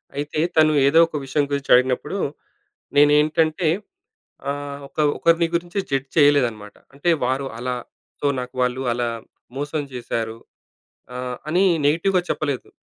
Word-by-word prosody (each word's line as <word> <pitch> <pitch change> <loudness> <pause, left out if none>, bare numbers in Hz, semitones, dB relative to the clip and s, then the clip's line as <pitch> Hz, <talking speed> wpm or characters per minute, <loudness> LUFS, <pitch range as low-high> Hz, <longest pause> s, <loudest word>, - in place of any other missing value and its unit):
అయితే 145 +1 -3 0.2
తను 155 -1 +5
ఏదో 160 +4 +5
ఒక 155 - -5
విషయం 140 +2 0
గురించి 140 -1 -2
అడిగినప్పుడు. 130 +8 +1 0.8
నేనేంటంటే 155 +3 +3 0.8
ఆహ్, 145 0 -5
ఒక - - -26 0.2
ఒకరిని 165 0 +3
గురించి 175 +3 -2
జడ్జ్ 135 0 -1
చేయలేదనమాట. 125 -8 +3 0.2
అంటే 160 +5 0
వారు 130 +2 -1
అలా 125 +1 -2 0.5
సో, 145 - 0
నాకు 125 0 -8
వాళ్ళు 125 +1 0
అలా 120 0 -1 0.5
మోసం 145 +1 -2
చేశారు 115 -2 -4 0.8
ఆహ్, 125 0 -4
అని 180 +4 +2 0.2
నెగెటివ్‌గా 175 +5 +2
చెప్పలేదు. 145 -4 -2
145 Hz, 125 wpm, -22 LUFS, 125-155 Hz, 0.8 s, తను